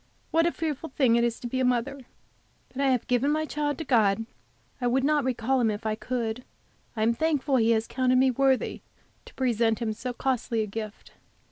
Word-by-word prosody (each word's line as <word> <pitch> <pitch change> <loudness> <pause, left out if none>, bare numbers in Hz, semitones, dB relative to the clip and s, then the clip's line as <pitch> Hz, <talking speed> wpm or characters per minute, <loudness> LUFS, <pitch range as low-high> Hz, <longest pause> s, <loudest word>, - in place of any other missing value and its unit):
What 330 +1 +3
a - - +1
fearful 320 -1 -4
thing 260 -4 +3
it 235 - +3
is 235 -1 -1
to 240 - -4
be 260 +2 -2
a - - +2
mother! 250 +3 0 0.7
But 270 - -5
I 275 - +3
have 255 -3 +1
given 250 +2 +1
my 310 +1 +1
child 295 -1 -2
to 320 - -4
God. 225 -5 +2 0.6
I 245 - +1
would 260 +2 +1
not 295 0 +2
recall 255 +1 0
him 225 - +3
if 210 +1 -4
I 215 - +1
could. 235 +1 -3 0.5
I 215 - 0
am 230 +1 +3
thankful 290 -1 +1
He 225 -1 +3
has 225 -1 +2
counted 255 +1 +1
me 260 0 +4
worthy 265 +1 +1 0.4
to - - -14
present 230 -3 +1
Him 225 -2 -2
so 250 +4 -5
costly 245 -3 -1
a - - -2
gift. 215 0 -7
250 Hz, 215 wpm, -27 LUFS, 230-270 Hz, 0.7 s, me